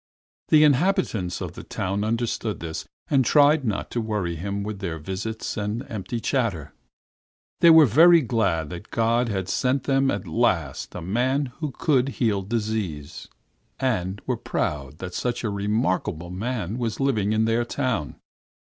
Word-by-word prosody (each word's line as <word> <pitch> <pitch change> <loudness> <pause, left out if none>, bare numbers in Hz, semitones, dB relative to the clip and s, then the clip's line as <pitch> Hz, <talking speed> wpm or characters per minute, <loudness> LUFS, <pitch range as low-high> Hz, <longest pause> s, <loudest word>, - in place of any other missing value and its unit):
The 155 -1 +6
inhabitants 145 - +1
of - - -5
the - - -8
town 100 +2 -3
understood 115 -1 -2
this, 80 -1 -6 0.2
and 135 -2 +4
tried 145 +3 +5
not 105 -4 -2
to 120 - -1
worry 105 -6 -2
him 100 +4 -3
with 105 -1 -5
their 85 -5 -3
visits 95 +9 -5
and 105 +4 -2
empty 110 +2 -4
chatter. 110 - -1 0.9
They 170 - +7
were 160 -2 +9
very 165 +8 +6
glad 100 - 0
that 90 +4 -8
God 115 +1 +1
had 95 -3 -2
sent 130 +5 0
them 135 -1 +2
at - - -2
last 85 - 0
a 90 - -5
man 125 - 0
who 155 -2 -2
could 135 -1 +1
heal 110 -5 +1
diseases, 100 -8 -3 0.5
and 100 -7 -1
were - - -1
proud 70 -1 -3
that 90 +1 -7
such 125 +4 -2
a 110 - -1
remarkable 100 -4 -1
man 110 +1 -3
was 115 -3 -2
living 110 -7 +1
in 110 +1 +2
their 115 +1 +1
town. 120 - -2
110 Hz, 160 wpm, -24 LUFS, 95-125 Hz, 0.9 s, were